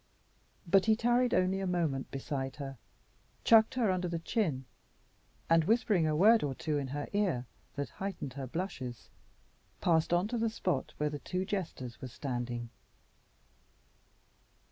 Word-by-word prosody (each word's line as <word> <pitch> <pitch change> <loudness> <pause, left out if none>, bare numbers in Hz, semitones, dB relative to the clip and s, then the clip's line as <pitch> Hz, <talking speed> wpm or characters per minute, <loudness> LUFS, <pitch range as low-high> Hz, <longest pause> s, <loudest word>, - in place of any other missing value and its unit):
But 190 +2 +4
he 220 - +6
tarried 240 +2 +2
only 185 +1 +2
a 195 - -2
moment 165 -7 0
beside 135 -1 -4
her, 135 -4 -7 0.6
chucked 225 +2 +6
her 230 -6 +2
under 180 -1 0
the 170 -1 -2
chin, 165 - -1 0.8
and, 165 -1 +4
whispering 210 -5 +3
a 155 - +1
word 220 +7 +6
or 140 -2 -2
two 150 +1 -1
in 140 - -3
her 145 +2 -4
ear 185 -12 +1 0.3
that 140 -1 -3
heightened 190 -9 -5
her 135 -1 -5
blushes, 125 - -5 0.7
passed 165 -2 +2
on 175 +3 +3
to 240 -1 -1
the 225 0 +2
spot 185 -5 -2
where 150 0 0
the 145 - -4
two 185 +4 -2
jesters 160 - -4
were 130 - -4
standing. 120 -2 -4
165 Hz, 150 wpm, -32 LUFS, 135-195 Hz, 0.8 s, he